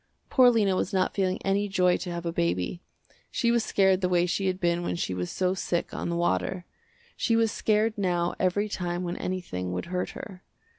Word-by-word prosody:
Poor 255 Hz, -1 st, +7 dB
Lena 210 Hz, -5 st, +2 dB
was 190 Hz, +2 st, -1 dB
not 185 Hz, -1 st, +1 dB
feeling 190 Hz, -1 st, 0 dB
any 200 Hz, +1 st, +1 dB
joy 180 Hz, -2 st, +3 dB
to 180 Hz, -, -4 dB
have 170 Hz, 0 st, -5 dB
a 170 Hz, -, -2 dB
baby. 90 Hz, -, -1 dB, 0.5 s
She 235 Hz, -, +1 dB
was 235 Hz, -1 st, +2 dB
scared 190 Hz, -2 st, +3 dB
the 180 Hz, -, +1 dB
way 175 Hz, -1 st, +3 dB
she 190 Hz, +2 st, -1 dB
had 185 Hz, 0 st, -1 dB
been 175 Hz, -1 st, +1 dB
when 175 Hz, -, -2 dB
she 130 Hz, -, -2 dB
was 90 Hz, -1 st, -3 dB
so 185 Hz, 0 st, 0 dB
sick 175 Hz, -2 st, -2 dB
on -, -, -3 dB
the 170 Hz, -, -1 dB
water. 170 Hz, -, 0 dB, 0.5 s
She 230 Hz, -, +1 dB
was 225 Hz, -1 st, +3 dB
scared 215 Hz, +1 st, +1 dB
now 175 Hz, -2 st, +1 dB
every 190 Hz, +3 st, +1 dB
time 175 Hz, -3 st, -3 dB
when 175 Hz, 0 st, -3 dB
anything 90 Hz, -, -3 dB
would 90 Hz, -, -3 dB
hurt 180 Hz, -, -1 dB
her. 190 Hz, -3 st, -9 dB
185 Hz, 210 wpm, -27 LUFS, 175-195 Hz, 0.5 s, Poor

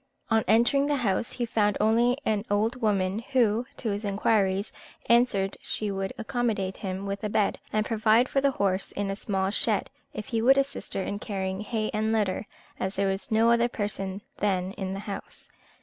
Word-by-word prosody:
On 225 Hz, 0 st, +4 dB
entering 240 Hz, +6 st, +4 dB
the 290 Hz, -, +2 dB
house, 195 Hz, +3 st, 0 dB
he 245 Hz, -, -2 dB
found 210 Hz, -3 st, +1 dB
only 235 Hz, +4 st, +3 dB
an 210 Hz, -2 st, +1 dB
old 220 Hz, +5 st, 0 dB
woman, 200 Hz, -2 st, +1 dB
who, 235 Hz, -1 st, +1 dB
to 225 Hz, -, -2 dB
his 205 Hz, +2 st, -3 dB
inquiries, 200 Hz, -1 st, +1 dB, 0.3 s
answered 235 Hz, -5 st, +3 dB
she 210 Hz, -2 st, -2 dB
would 195 Hz, 0 st, -2 dB
accommodate 220 Hz, -5 st, -1 dB
him 190 Hz, 0 st, -4 dB
with 200 Hz, +1 st, -4 dB
a 210 Hz, -, -1 dB
bed, 205 Hz, -1 st, +1 dB
and 215 Hz, 0 st, +1 dB
provide 225 Hz, +2 st, +3 dB
for 275 Hz, -, +1 dB
the 280 Hz, -, +4 dB
horse 195 Hz, -6 st, -1 dB
in 200 Hz, -1 st, -2 dB
a -, -, -2 dB
small 195 Hz, -2 st, -1 dB
shed, -, -, 0 dB, 0.2 s
if 210 Hz, -, -6 dB
he 230 Hz, -3 st, 0 dB
would 265 Hz, +4 st, +6 dB
assist 275 Hz, 0 st, -2 dB
her 195 Hz, -, 0 dB
in 205 Hz, -, -3 dB
carrying 190 Hz, -2 st, -3 dB
hay 215 Hz, 0 st, -2 dB
and 215 Hz, +1 st, 0 dB
litter, 210 Hz, -2 st, 0 dB, 0.3 s
as 190 Hz, +1 st, -2 dB
there 195 Hz, 0 st, +1 dB
was 195 Hz, +1 st, -3 dB
no 225 Hz, +1 st, +4 dB
other 235 Hz, 0 st, +4 dB
person 200 Hz, -3 st, -4 dB
then 190 Hz, -2 st, 0 dB
in 190 Hz, -1 st, -4 dB
the 195 Hz, -, -5 dB
house. 205 Hz, -1 st, -2 dB
210 Hz, 195 wpm, -27 LUFS, 195-230 Hz, 0.3 s, would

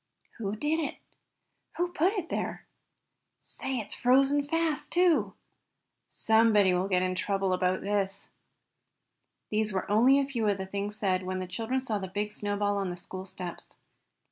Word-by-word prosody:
"Who 205 Hz, -2 st, -2 dB
did 300 Hz, +8 st, 0 dB
it?" 305 Hz, -, -3 dB, 0.8 s
"Who 350 Hz, 0 st, +1 dB
put 350 Hz, +3 st, +1 dB
it 370 Hz, -6 st, -3 dB
there?" -, -, -3 dB, 0.7 s
"Say, 265 Hz, -1 st, -4 dB
it's 215 Hz, -3 st, -4 dB
frozen 275 Hz, +3 st, +3 dB
fast, 325 Hz, -1 st, 0 dB
too!" 350 Hz, -2 st, +3 dB, 0.7 s
"Somebody 220 Hz, -4 st, +4 dB
will 180 Hz, +2 st, +1 dB
get 185 Hz, -2 st, +2 dB
into 185 Hz, 0 st, -1 dB
trouble 195 Hz, -2 st, 0 dB
about 185 Hz, 0 st, +1 dB
this." 200 Hz, -1 st, -1 dB, 1.2 s
These 215 Hz, 0 st, +1 dB
were 190 Hz, +1 st, -2 dB
only 245 Hz, +6 st, +6 dB
a 280 Hz, -, +2 dB
few 240 Hz, -6 st, -1 dB
of 200 Hz, -1 st, +2 dB
the 190 Hz, -, -4 dB
things 200 Hz, +2 st, -3 dB
said 190 Hz, -3 st, +1 dB
when 185 Hz, 0 st, -3 dB
the 185 Hz, -, -3 dB
children 225 Hz, +8 st, -2 dB
saw 220 Hz, -5 st, -2 dB
the 190 Hz, -, -5 dB
big 205 Hz, +3 st, -3 dB
snowball 205 Hz, -1 st, -1 dB
on 195 Hz, -2 st, -1 dB
the 175 Hz, -, -5 dB
school 185 Hz, +2 st, -7 dB
steps. 180 Hz, -2 st, -8 dB
205 Hz, 165 wpm, -29 LUFS, 190-265 Hz, 1.2 s, only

